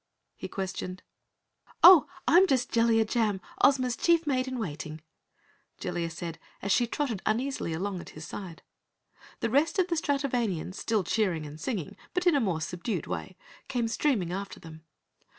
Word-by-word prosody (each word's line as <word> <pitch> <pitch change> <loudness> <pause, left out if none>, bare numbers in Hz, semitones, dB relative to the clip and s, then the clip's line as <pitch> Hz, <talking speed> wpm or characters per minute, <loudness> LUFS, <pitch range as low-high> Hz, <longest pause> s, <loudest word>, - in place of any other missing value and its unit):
he - - -6
questioned. 185 -2 -5 0.8
"Oh, 350 -6 +10 0.2
I'm 350 +8 +6
just 260 -6 +1
Jellia 230 -1 +3
Jam, 215 -3 0 0.2
Ozma's 255 -3 +4
Chief 335 +5 +3
Maid 260 -3 0
in 260 0 -3
Waiting," 155 -6 -5 0.8
Jellia 175 -2 -2
said 165 0 -6 0.2
as 200 - -2
she 240 +3 +3
trotted 235 -6 -2
uneasily 245 -3 -1
along 185 +2 -3
at - - -11
his 155 - -7
side. 175 -2 -8 0.8
The 230 - 0
rest 290 - +2
of 370 -1 +2
the 340 - +1
Stratovanians, 250 - -1
still 215 0 0
cheering 180 -7 0
and 150 +1 -9
singing, 200 - -3 0.2
but 360 0 0
in 350 - +5
a 285 - +3
more 180 -8 0
subdued 180 +7 -3
way, - - -5 0.3
came 240 -3 -1
streaming 225 - 0
after 195 +1 -5
them. 160 -1 -12
220 Hz, 160 wpm, -28 LUFS, 180-265 Hz, 0.8 s, Oh